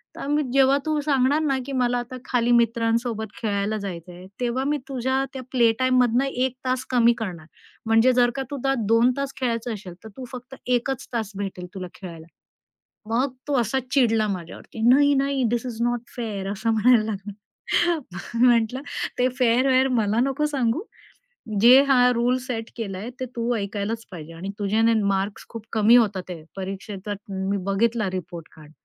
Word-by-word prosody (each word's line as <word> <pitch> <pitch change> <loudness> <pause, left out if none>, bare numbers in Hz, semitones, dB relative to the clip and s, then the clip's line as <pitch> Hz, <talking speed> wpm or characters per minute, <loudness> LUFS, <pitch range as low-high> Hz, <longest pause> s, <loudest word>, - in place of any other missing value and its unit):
तर 295 +2 0
जेव्हा 275 0 +5
तू 310 -1 0
सांगणार 280 0 +2
ना 280 -4 +1
की, 280 - -5
मला 245 -1 +1
आता 250 +2 -7
खाली 245 -1 +1
मित्रांसोबत 230 -1 +1
खेळायला 205 -1 -1
जायचंय, 180 -2 -7 0.2
तेव्हा 245 +2 0
मी 295 +1 +1
तुझ्या 260 0 0
त्या 265 - -5
प्ले 235 -3 +4
टाईममधनं 255 -1 +3
1 260 -1 -1
तास 255 0 -1
कमी 240 -1 +5
करणार. 180 -8 -5 0.4
म्हणजे 225 +3 +4
जर 245 -1 +4
का 270 - -2
तू 285 - -3
आता 270 +1 +1
2 230 +2 +4
तास 275 -1 -3
खेळायचं 235 -2 -1
असेल, 190 -4 -8
तर 220 - -9
तू 260 - -6
फक्त 255 +1 -9
1 250 +1 +1
च 265 - -5
तास 220 -3 -2
भेटेल 190 -3 -5
तुला 185 -1 -5
खेळायला." 170 -4 -10 0.9
मग 255 +3 +1 0.2
तो 280 -3 +2
असा 235 +3 0
चिडला 225 -5 +3
माझ्यावरती. 185 +3 -7
"नाही, 285 +3 +5
नाही, 275 0 +1
धिस 240 +1 -1
इस 235 -3 -6
नॉट 240 0 +1 0.2
फेअर." 205 -5 -4
असं 215 +3 -1
म्हणायला 225 0 +4
लागला. 205 -1 -5 0.8
मग 230 +5 -6
मी 250 - +7
म्हटलं, 240 +1 +3 0.4
"ते 250 - +3
फेअर-वेअर 255 +2 +3
मला 220 -1 +1
नको 275 +3 +1
सांगू. 275 +1 0 0.8
जे 250 +4 +8
हा 250 -2 +5
रूल्स 245 +2 0
सेट 225 -2 -4
केलंय, 205 0 -5
ते 260 - -2
तू 235 +1 0
ऐकायलाच 210 +2 -3
पाहिजे. 165 -2 -9
आणि 180 +4 -7
तुझ्याने 220 +3 +2
मार्क्स 200 +1 -1
खूप 225 -2 -8
कमी 220 +1 +5
होत 210 -5 +2
आहेत. 165 -3 -8
परीक्षेचा 195 +1 -5 0.4
मी 200 - +1
बघितला 215 +1 +1
रिपोर्ट 175 -3 -6
कार्ड. 155 -1 -15
235 Hz, 175 wpm, -24 LUFS, 205-255 Hz, 0.9 s, जे